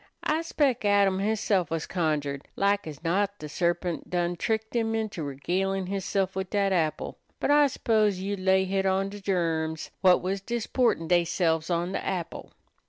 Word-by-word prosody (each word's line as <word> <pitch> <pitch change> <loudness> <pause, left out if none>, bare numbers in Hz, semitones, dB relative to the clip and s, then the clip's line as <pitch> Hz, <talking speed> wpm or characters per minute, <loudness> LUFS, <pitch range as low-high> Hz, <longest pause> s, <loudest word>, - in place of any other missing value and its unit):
I 310 +2 +1
'spec' 285 -7 0
Adam 200 -2 +3
hisself 205 -4 +1
was 165 -1 -2
conjured. 150 -5 -2
Lak 200 -2 +1
as 150 -1 -8
not 200 +4 0
de 150 - -7
sarpint 175 +2 -1
done 175 0 0
tricked 220 +5 -2
him 225 -1 +1
into 215 -6 -3
regalin' 185 +7 -1
hisself 195 -1 -1
wid 190 -1 -3
dat 200 -2 +1
apple. 160 -4 -1 0.2
But - - +1
I 290 0 +6
s'pose 215 -6 +1
you'd 195 +1 -3
lay 190 0 +3
hit 195 0 0
on 190 +1 +1
de 205 0 -9
germs 165 -4 -1
whut 185 -2 +5
was 190 +1 -2
disportin' 235 -4 0
deyselves 170 -1 +1
on 175 +1 0
de - - -3
apple. 175 -3 -4
190 Hz, 170 wpm, -27 LUFS, 170-205 Hz, 0.2 s, I